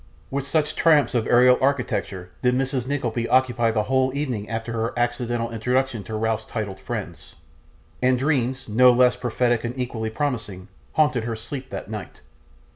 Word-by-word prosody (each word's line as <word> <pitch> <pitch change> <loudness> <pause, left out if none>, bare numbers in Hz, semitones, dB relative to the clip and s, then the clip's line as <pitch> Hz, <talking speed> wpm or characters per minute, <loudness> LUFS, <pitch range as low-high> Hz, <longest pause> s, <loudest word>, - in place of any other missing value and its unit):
With 140 0 -2
such 155 +1 0
triumphs 150 -6 +4
of 120 -2 0
aerial 125 +1 +5
architecture 120 -9 -1
did 125 0 +2
Mrs. 130 -1 -1
Nickleby 120 -4 -2
occupy 120 -3 +3
the 110 -2 +1
whole 130 +2 +1
evening 125 -8 -3
after 115 +1 -4
her 115 +1 -2
accidental 120 -1 -1
introduction 125 0 -1
to 110 - -5
Ralph's 110 0 -1
titled 105 -4 -5
friends; 95 -4 -7 0.7
and 130 0 +3
dreams, 130 -1 0
no 125 +4 +6
less 125 0 +4
prophetic 120 -1 0
and 120 +2 -4
equally 115 -3 -3
promising, 110 -7 -3 0.2
haunted 150 -7 +2
her 115 -1 -2
sleep 130 +4 -7
that - - -6
night. 105 -3 -8
120 Hz, 160 wpm, -23 LUFS, 110-130 Hz, 0.7 s, no